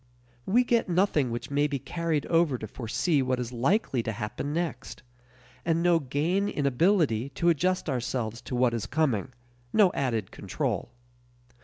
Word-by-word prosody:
We 235 +6 +4
get 235 -4 +1
nothing 175 -7 +2
which 120 +4 -5
may 145 +1 +2
be 145 -1 -2
carried 155 +2 -2
over 165 -5 +2
to 110 - -6
foresee 135 - 0
what 130 -1 0
is 125 0 -4
likely 135 - +1
to 110 - -3
happen 105 +6 -4
next, 155 -6 -4 0.6
and 165 0 +1
no 175 -1 +4
gain 160 +9 0
in 145 - -2
ability 140 - +2
to 170 - +2
adjust 180 +3 +1
ourselves 120 -3 -2
to 125 - -2
what 125 -1 +2
is 110 -2 -3
coming 130 -6 0 0.4
no 205 -4 +5
added 115 -8 -1
control. - - -3
140 Hz, 160 wpm, -27 LUFS, 125-170 Hz, 0.6 s, no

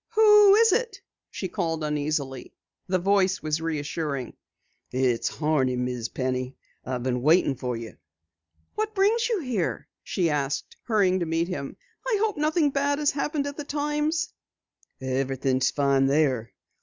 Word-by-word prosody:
"Who 420 -2 +7
is 450 0 +5
it?" 460 -1 0 0.3
she 190 - -4
called 165 -4 -2
uneasily. 145 -3 -3 0.3
The 185 0 +2
voice 190 0 +2
was 155 +1 -1
reassuring. 150 -4 -3 0.6
"It's 125 -2 +1
Horney, 150 -5 0
Miss 125 -2 -3
Penny. 130 0 -3 0.3
I've 125 -2 -4
been 125 -1 -1
waitin' 155 +1 +4
for 125 -2 -4
you." 115 -1 -9 0.8
"What 430 0 -3
brings 445 +4 +2
you 440 -6 0
here?" 235 - -2
she 170 -4 0
asked, 145 -1 -2
hurrying 195 -5 +2
to 170 - -2
meet 165 +2 0
him. 140 -6 -5 0.3
"I 465 -4 +2
hope 435 0 +1
nothing 305 0 +2
bad 285 +1 +1
has 295 -1 +2
happened 290 0 -2
at 285 0 -5
the 295 - -4
Times." 300 +3 -1 0.7
"Everything's 130 0 0
fine 140 -1 +2
there. 135 -5 +1
165 Hz, 145 wpm, -26 LUFS, -, 0.8 s, Who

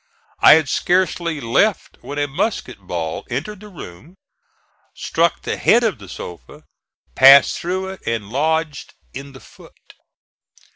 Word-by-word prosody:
I - - +8
had 160 -3 +1
scarcely 175 0 0
left 140 - 0
when 145 - -8
a 145 0 0
musket 145 - -3
ball 85 -4 -5
entered 160 - -5
the 210 - -12
room, 160 - -12 0.8
struck - - -1
the - - -3
head 240 - +3
of 220 - -1
the 95 -3 -13
sofa, 85 -2 -10 0.5
passed 135 +1 +6
through 185 +2 -3
it 190 - -10
and 110 -3 -3
lodged 155 +2 -2 0.2
in 140 +1 -9
the 130 - -13
foot. - - -19
145 Hz, 140 wpm, -19 LUFS, 125-180 Hz, 0.8 s, I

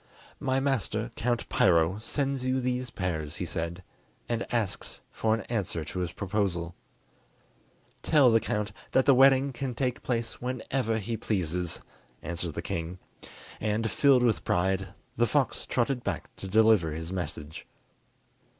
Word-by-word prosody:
"My 130 0 +1
master, 120 -4 -1
Count 120 +1 -1
Piro, 85 +3 +3
sends 135 +2 -1
you 130 +1 +1
these 125 0 -1
pears," 80 -7 -3
he - - -3
said, 85 +2 -4 0.4
"and 120 -1 -2
asks 110 -5 -2
for 110 0 +1
an 115 - -4
answer 95 -8 -2
to 90 - -5
his 90 -2 -2
proposal." 95 -4 -1 1.3
"Tell 145 -6 +5
the 115 - +5
count 105 -1 -2 0.2
that 130 - +4
the 140 - +7
wedding 135 +1 +5
can 130 -1 -4
take 125 -1 -1
place 115 -2 -2
whenever 125 -2 -1
he 115 +2 -3
pleases," 90 -5 -1 0.4
answered 85 -2 -4
the - - -3
king, 85 +2 -3 0.6
and, 110 +1 0
filled 135 -3 +5
with 115 -3 +2
pride, 95 +2 +1 0.3
the 120 - +3
fox 140 0 0
trotted 125 0 0
back - - -4
to 95 - -7
deliver 105 -5 +4
his 80 +3 -4
message. 80 -4 -5
110 Hz, 145 wpm, -28 LUFS, 90-125 Hz, 1.3 s, the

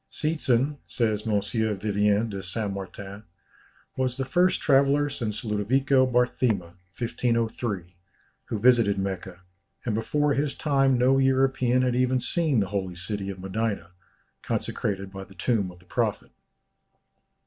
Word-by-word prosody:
"Seetzen," 145 -3 0
says 110 -2 -1
M. 105 -2 +2
Vivien 105 0 +1
de 100 -3 -5
Saint 100 +2 -2
Martin, 100 +1 -7 0.7
"was 130 -1 -1
the 135 - -1
first 180 +7 +2
traveller 140 +1 +3
since 115 -4 -4
Ludovico 130 +6 +2
Barthema 120 -7 +1 0.2
(1503) 115 -6 -1 0.5
who 110 - -3
visited 115 -3 +4
Mecca, 95 -2 -4 0.4
and 115 - 0
before 145 +7 +1
his 140 0 -1
time 135 -3 +2
no 130 +2 +4
European 130 -1 +2
had 125 -1 +1
even 130 0 +2
seen 150 -2 +1
the 95 - -2
holy 95 -3 -3
city 95 +2 -3
of 95 -1 -6
Medina, 100 +1 -3 0.5
consecrated 100 -1 -2
by 95 0 -6
the 95 0 -16
tomb 100 0 0
of 90 - -13
the 90 - -21
Prophet." - - -2
115 Hz, 135 wpm, -26 LUFS, 100-130 Hz, 0.7 s, visited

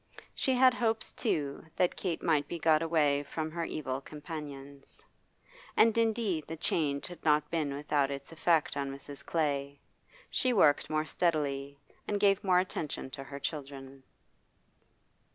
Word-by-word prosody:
She 265 - +1
had 255 0 +6
hopes, 225 -2 0
too, 145 - -1
that 180 - +2
Kate 175 -4 -3
might 150 -4 +2
be 170 - -4
got 160 -1 +4
away 150 -4 +2
from 155 +2 -4
her 170 0 -2
evil 135 -4 -3
companions. 145 - -8 0.7
And 225 0 +6
indeed 220 -8 +1
the 165 - -5
change 145 -3 0
had 175 -3 -8
not 150 -1 +3
been 150 -4 0
without 145 -1 +1
its 140 +1 -6
effect 165 -2 +2
on 140 -1 -2
Mrs. 140 +1 -8
Clay; 140 -3 -1 0.5
she 255 -1 +2
worked 150 -9 +4
more 155 0 0
steadily, 140 -5 -1 0.3
and 205 - 0
gave 200 -1 +4
more 185 -2 +4
attention 160 -7 -2
to 135 - -6
her 140 +1 -7
children. 135 -2 -6
155 Hz, 150 wpm, -31 LUFS, 140-175 Hz, 0.7 s, had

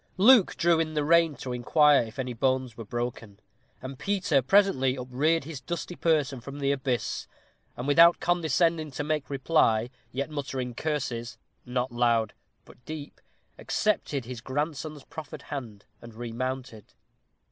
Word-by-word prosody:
Luke 220 +1 +6
drew 170 -1 +3
in 155 -1 -1
the 150 - +1
rein 165 -1 +4
to 125 -2 -5
inquire 145 +4 +4
if 115 +1 -8
any 125 -2 -3
bones 130 -1 0
were 115 - -7
broken; 115 -2 -5 0.4
and 130 0 -7
Peter 190 -8 +1
presently 135 -5 +3
upreared 135 +6 0
his 145 -2 -7
dusty 170 +4 -5
person 150 -7 +1
from 140 +3 -8
the 140 -1 +1
abyss, 130 -5 -2 0.5
and 125 - -4
without 165 +4 +6
condescending 165 -1 +1
to 145 +1 -4
make 150 -1 -1
any - - -29
reply, 130 -5 +2 0.2
yet 140 +4 -3
muttering 135 -4 -4
curses, 125 -4 -3 0.3
"not 125 +1 -1
loud, 120 -2 +1 0.3
but 125 - -18
deep," 150 +1 -8 0.4
accepted 150 - -1
his 120 -2 -7
grandson's 150 +2 -3
proffered 155 -2 -9
hand, 115 -8 -7 0.2
and 115 -1 -12
remounted. 120 -1 -5
135 Hz, 145 wpm, -27 LUFS, 125-155 Hz, 0.5 s, Luke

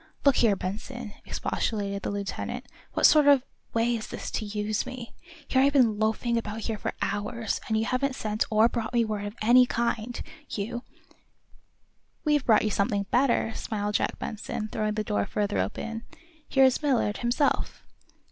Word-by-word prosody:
"Look 280 -2 +5
here, 220 -4 +4
Benson," 215 +4 -5
expostulated 200 -2 -2
the - - -3
lieutenant, 200 -1 -4 0.3
"what - - +3
sort 300 -2 +7
of 280 -3 +6 0.3
way 230 +1 +2
is 220 -1 -5
this - - -6
to 220 - -2
use 210 +1 -1
me? 255 -2 -8 0.3
Here 260 - +3
I've 280 +1 +4
been 230 -7 +4
loafing 220 +2 +1
about 220 0 -5
here 220 -1 -3
for - - -3
hours, 205 +2 -2
and 220 - +1
you 220 - +1
haven't 255 +2 0
sent 215 -3 -1
or 220 +1 +5
brought 235 0 -3
me 235 -1 +4
word 210 -2 -3
of 205 - -8
any 250 +3 +6
kind. 235 0 -1 0.3
You 235 +4 -3 0.7
" - - -36
"We've 295 -2 +3
brought 220 -4 +4
you 215 - 0
something 200 0 +1
better," 245 -3 +2
smiled 210 -2 -3
Jack - - 0
Benson, 215 0 -4
throwing 215 -1 -1
the 215 - -1
door 100 - -1
further 205 - -1
open. 225 - -3 0.5
"Here 270 - +5
is 260 +2 +3
Millard, 250 -8 +1
himself." 245 +4 0
225 Hz, 175 wpm, -27 LUFS, 210-245 Hz, 0.7 s, sort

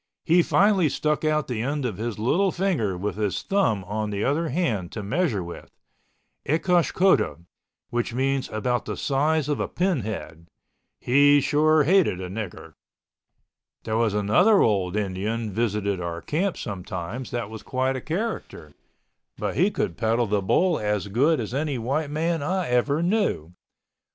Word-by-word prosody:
He 175 +2 +5
finally 190 -2 +3
stuck 150 +3 -1
out 155 -1 +1
the 120 -4 -3
end 140 +2 -2
of 110 -7 -3
his 115 0 -4
little 170 - +2
finger 155 - -1
with 100 +3 -3
his 105 -3 -1
thumb 190 - +1
on 105 +3 -3
the 100 0 -2
other 155 +4 0
hand 115 - -1
to 110 - -5
measure 105 - 0
with—ecosh 165 - -3
cota, 190 +1 +2 0.5
which 120 0 -1
meant 135 +2 -1
about 120 +3 -1
the - - -4
size 150 +2 +1
of 145 -2 -1
a - - -1
pin 180 -4 0
head. 95 -6 -6 0.5
He 145 +3 +5
sure 155 +2 +3
hated 165 - +3
a 90 -1 -6
nigger. 105 -2 -7 1.1
There 110 - -2
was 110 -2 +1
another 180 - +4
old 95 -4 +1
Indian 105 +2 -2
visited 100 -3 -1
our 85 -1 -4
camp 180 +5 -1
sometimes, 100 +4 -5
that 120 -3 -4
was 110 - -8
quite 130 0 -1
a 130 - -4
character. 200 - -4 0.6
But - - -3
he 190 - +3
could 90 - -3
peddle 115 +2 +1
the 105 -1 0
bull 170 - +2
as 105 -1 -1
good 140 +9 +2
as 115 0 -4
any 145 0 -1
white 140 +6 -1
man 165 +2 -1
I 180 +3 -1
ever 140 +6 +1
knew. 175 - 0
125 Hz, 160 wpm, -24 LUFS, 105-155 Hz, 1.1 s, He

